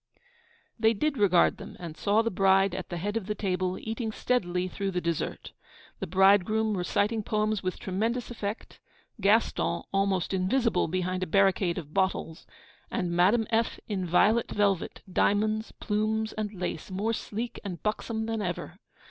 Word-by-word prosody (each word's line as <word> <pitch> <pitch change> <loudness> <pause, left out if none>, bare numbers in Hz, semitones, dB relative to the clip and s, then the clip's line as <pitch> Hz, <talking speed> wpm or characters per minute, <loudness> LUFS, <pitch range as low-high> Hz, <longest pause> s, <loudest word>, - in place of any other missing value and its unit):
They 225 0 +4
did 300 +7 0
regard 180 -4 +4
them, - - -10
and 170 -3 -7
saw 210 +5 +2
the 230 - -1
bride 195 0 +3
at 185 0 -5
the 175 - -4
head 205 +5 -3
of 220 -4 -2
the 210 - -1
table, 185 -2 -1
eating 225 0 -4
steadily 185 -7 0
through 195 +2 -3
the 180 -2 -1
dessert; 170 -2 -3 0.5
the - - -3
bridegroom 200 +4 +4
reciting 205 +4 0
poems 215 0 0
with 185 -1 -3
tremendous 225 +6 -2
effect; 215 -2 -5 0.4
Gaston 195 - +2
almost 195 -2 +1
invisible 220 +6 +1
behind 185 +2 -2
a 185 - -1
barricade 190 -1 +2
of 155 -4 -7
bottles; 185 -4 -1 0.4
and 175 -1 -2
Madame 190 +7 +3
F., 225 0 +1
in 200 -3 -2
violet 215 +7 +3
velvet, 200 -4 0
diamonds, 215 +3 +1
plumes, 215 +1 -1
and 215 -1 -3
lace, 180 -5 -5
more 205 +4 -1
sleek 230 +2 -4
and 185 -5 -6
buxom 220 +1 -2
than 225 -1 -2
ever. 180 0 -4
200 Hz, 155 wpm, -28 LUFS, 185-220 Hz, 0.5 s, They